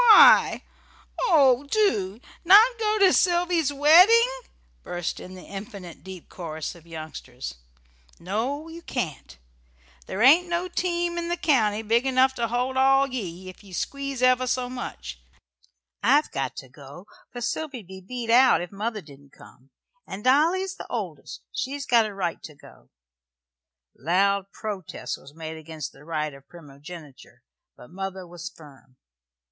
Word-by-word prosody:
Why? - - +7 0.6
Oh, 275 - +4
do! 220 - +1 0.2
Not 400 +6 +8
go 430 -1 +1
to 385 -3 +5
Sylvy's 345 -4 +2
wedding?" 360 - +6 0.5
burst 175 -1 -4
in 185 +1 -10
the 185 - -11
"infinite 195 - -9
deep 185 -2 -10
chorus" 160 -3 -6
of 170 -1 -18
youngsters. 155 - -8 0.7
"No, 240 - -3
you 330 +1 -10
can't. 180 - -5 0.7
There 210 - -2
ain't 335 +7 +6
no 345 +1 -1
team 345 -1 -1
in 340 - -4
the 345 +1 -1
county 225 -10 +1
big 230 +4 +1
enough 260 0 +3
to 235 -1 0
hold 250 +3 -2 0.4
ye 185 -6 -5
all, - - -10
if 185 +2 -12
ye 195 -2 -14
squeeze 275 +5 -4
ever 255 0 +4
so 250 0 -1
much. 60 - -7 0.8
I've 280 +8 +3
got 135 -1 -3
to 135 - -9
go, 140 +7 -13 0.3
for 245 - -7
Sylvy'd 245 -1 -4
be 190 +1 -11
beat 235 +3 -4
out 255 +2 +6
if 175 - -6
mother 210 +2 -4
didn't 140 -2 -17
come. 130 +2 -18 0.4
And 200 +2 -7
Dolly's 340 +9 +2
the - - -9
oldest. - - -6
She's 280 +2 -4
got 235 -4 +4
a 210 - -8
right 180 -4 -3
to 150 - -11
go." - - -18 1.1
Loud 195 +5 +1
protest 205 -6 -6
was 140 +2 -15
made 160 0 -7
against 160 -2 -7
the - - -18
right 155 -2 -3
of 140 0 -16
primogeniture, 150 -2 -13 0.3
but 125 - -15
mother 190 0 -6
was 175 -1 -8
firm. 140 -4 -18
215 Hz, 150 wpm, -25 LUFS, 170-285 Hz, 1.1 s, Not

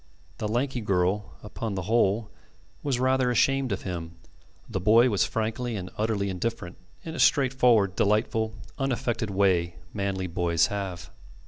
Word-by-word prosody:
The 105 - -1
lanky 125 +3 -1
girl, 95 0 0
upon 105 0 -5
the 95 - -3
whole, 110 +1 +1 0.5
was 135 -4 -1
rather 130 0 +2
ashamed 135 +1 +2
of - - -3
him; 85 -2 -5 0.5
the 95 - -3
boy 115 +6 +5
was 100 - +2
frankly 115 +2 -2
and 95 -2 -6
utterly 105 -2 0
indifferent 95 -1 -4 0.3
in 160 - -6
a - - -6
straightforward, 125 -8 +4
delightful, 110 +1 +1 0.2
unaffected 120 -4 -1
way 95 -4 +2 0.2
manly 100 -2 -2
boys 85 -2 +1
have. 90 -6 -5
105 Hz, 140 wpm, -27 LUFS, 95-120 Hz, 0.5 s, boy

